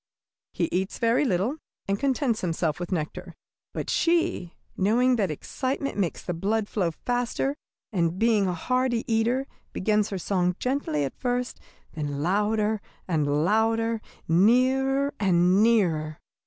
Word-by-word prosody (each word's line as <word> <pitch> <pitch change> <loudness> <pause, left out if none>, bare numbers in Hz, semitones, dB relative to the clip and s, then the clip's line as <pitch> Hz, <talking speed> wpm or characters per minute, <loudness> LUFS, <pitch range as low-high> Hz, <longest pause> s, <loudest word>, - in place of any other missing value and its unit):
He - - -1
eats 190 +2 -1
very 230 +4 +2
little, 215 - 0 0.3
and 195 +1 0
contents 265 -4 0
himself 165 -3 -1
with 175 +1 -5
nectar. 160 -4 -4 0.4
But - - -4
she, 330 - +1 0.2
knowing 240 +6 +3
that 200 -5 +1
excitement 265 - -3
makes 190 -5 -2
the 175 - -3
blood 205 +5 -1
flow 190 -6 0
faster, 245 - -2 0.4
and 170 -2 +1
being 220 -2 +3
a 180 - 0
hearty 255 +4 0
eater, 235 +3 +1 0.3
begins 210 +1 +1
her 195 - -3
song 180 -1 0
gently 250 - -1
at 135 - -5
first, 245 0 -2 0.3
then 145 -2 -3
louder 210 +3 +1 0.3
and 150 -3 +1
louder, 225 +2 +1 0.3
nearer 260 - +3
and 185 0 +4
nearer. 170 -9 +2
210 Hz, 135 wpm, -26 LUFS, 175-245 Hz, 0.4 s, and